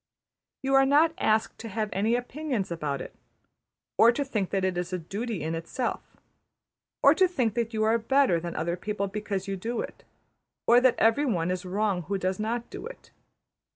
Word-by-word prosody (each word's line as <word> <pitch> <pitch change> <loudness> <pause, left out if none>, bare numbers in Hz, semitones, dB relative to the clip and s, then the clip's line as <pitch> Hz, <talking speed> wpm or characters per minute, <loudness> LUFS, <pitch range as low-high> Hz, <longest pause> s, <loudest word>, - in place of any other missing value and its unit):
You 270 0 0
are 270 0 +6
not 310 +4 +4
asked 215 0 +1
to 225 - -7
have 215 0 -2
any 215 +5 +1
opinions 250 - -3
about 150 -5 -3
it; - - -9 0.8
or 230 - +8
to 280 +4 -2
think 215 -8 -2
that 195 -1 0
it 185 -1 0
is 175 +1 -3
a 185 - -1
duty 200 +3 -4
in 160 +1 -2
itself; 170 +10 -3 1.0
or - - +8
to 375 - +4
think 250 - 0
that 235 0 -1
you 215 -1 0
are 225 +2 +3
better 260 -6 +3
than 170 +1 -6
other 170 +2 -1
people 200 +2 -3
because 200 -1 -4
you 195 - -2
do 230 +6 -3
it, - - -8 0.6
or 240 +1 +6
that 255 -1 +4
every 230 +6 +3
one 180 -6 0
is 185 0 -3
wrong 195 0 0
who 195 +4 -2
does 185 +1 -2
not 230 +2 -2
do - - -7
it. - - -13
215 Hz, 195 wpm, -27 LUFS, 185-245 Hz, 1.0 s, or